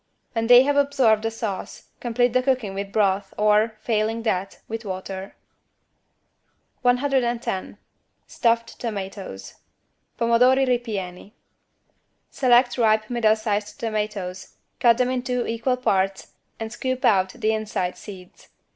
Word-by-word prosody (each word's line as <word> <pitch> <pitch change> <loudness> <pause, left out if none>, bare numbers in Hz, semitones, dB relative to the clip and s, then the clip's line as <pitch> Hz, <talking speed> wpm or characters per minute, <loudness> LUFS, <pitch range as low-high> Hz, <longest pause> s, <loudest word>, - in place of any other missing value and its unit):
When 225 -1 -1
they 245 +1 +8
have 285 +1 +1
absorbed 265 -6 +3
the 225 - -1
sauce, 220 -4 -6
complete 245 0 +1
the 255 - +3
cooking 255 -6 0
with 195 0 -5
broth 195 -2 0
or, 215 +1 +3
failing 225 0 -1
that, 195 -3 -2
with 225 +1 -5
water. 190 0 -6 1.5
110 245 -5 0 0.5
STUFFED 230 0 0
TOMATOES 195 - -6 0.6
(Pomodori 250 +3 +4
ripieni) 210 -6 -3 1.0
Select 245 -1 +3
ripe 215 0 +2
middle 225 -3 +3
sized 210 -1 -3
tomatoes, 210 -4 -4 0.2
cut 235 -1 +5
them 250 0 +1
in 255 -1 -1
two 250 -1 -2
equal 230 +3 -1
parts 195 -5 0 0.3
and 225 0 -5
scoop 255 +1 -2
out 190 -2 +3
the 220 +1 0
inside 215 -4 -2
seeds. 185 -4 -12
225 Hz, 120 wpm, -23 LUFS, 200-245 Hz, 1.5 s, they